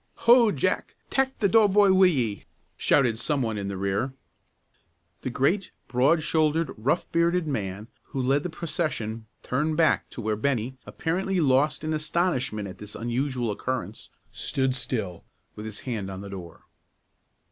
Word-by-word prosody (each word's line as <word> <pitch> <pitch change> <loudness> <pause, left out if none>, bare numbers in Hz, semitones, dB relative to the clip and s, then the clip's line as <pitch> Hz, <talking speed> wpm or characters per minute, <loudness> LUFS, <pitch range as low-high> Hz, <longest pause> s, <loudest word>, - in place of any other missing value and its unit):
"Ho, 235 -2 +7
Jack, - - -1 0.2
tak' 265 0 +1
the 205 - +2
door 215 +1 +5
boy 200 -1 +5
wi' 190 0 +7
ye!" 120 - -1 0.3
shouted 120 -5 +2
some 140 +1 0
one 110 -2 -1
in 100 -1 -3
the 100 -1 -4
rear. 100 +7 -1 1.1
The - - -3
great, 165 +10 +1 0.2
broad 135 +6 +3
shouldered, 160 +1 +1
rough 125 +10 0
bearded 170 +1 +2
man 105 -7 -3 0.2
who 135 - -5
led 135 +3 +2
the 180 - -4
procession 150 - -3 0.2
turned 155 +4 0
back 165 -2 +3
to - - -9
where 110 -1 0
Bennie, 125 +1 -1
apparently 185 +3 -1
lost 150 +1 +2
in 155 0 -1
astonishment 150 - -1
at 95 - -10
this 105 0 -9
unusual 120 0 -1
occurrence, 110 -2 -4 0.2
still 130 +3 0
stood, 110 -9 -3 0.3
with 105 - -7
his 110 -1 -6
hand 110 -7 -4
on 95 0 -6
the 100 0 -8
door. 90 -4 -9
130 Hz, 160 wpm, -26 LUFS, 110-165 Hz, 1.1 s, Ho